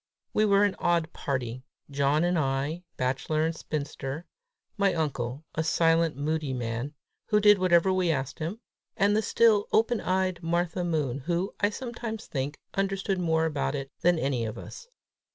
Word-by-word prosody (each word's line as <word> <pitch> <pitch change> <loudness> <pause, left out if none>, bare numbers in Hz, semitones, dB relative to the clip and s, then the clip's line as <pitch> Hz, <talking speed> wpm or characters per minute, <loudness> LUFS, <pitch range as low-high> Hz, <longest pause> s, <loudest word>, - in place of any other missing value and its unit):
We 215 - +3
were 200 -1 +4
an 205 -2 +2
odd 170 -1 +1
party: 130 -3 -3 0.3
John 140 +3 +2
and 175 +1 +2
I, 140 +2 0 0.2
bachelor 135 +5 0
and 165 0 -1
spinster; 145 0 -4 0.5
my 200 -2 +2
uncle, 140 -3 -2
a 160 - -1
silent, 165 -1 +2
moody 150 -1 -1
man, 120 +4 -3 0.3
who 210 - +3
did 210 -1 +6
whatever 185 0 +4
we 185 -2 +1
asked 135 0 -1
him; 170 +8 -3 0.4
and 205 +1 +3
the 215 - +3
still, 220 -2 +3
open 225 +1 +2
eyed 185 -1 0
Martha 170 +1 0
Moon, 150 -7 -1
who, 175 +7 -1
I 205 - +3
sometimes 230 -1 -5
think, 140 +1 -3 0.2
understood 195 0 -1
more 160 -2 +2
about 150 -2 -1
it 135 -1 -4
all - - -60
than 175 0 +4
any 135 -5 0
of 110 0 -4
us. 475 - -9
165 Hz, 170 wpm, -28 LUFS, 140-190 Hz, 0.5 s, did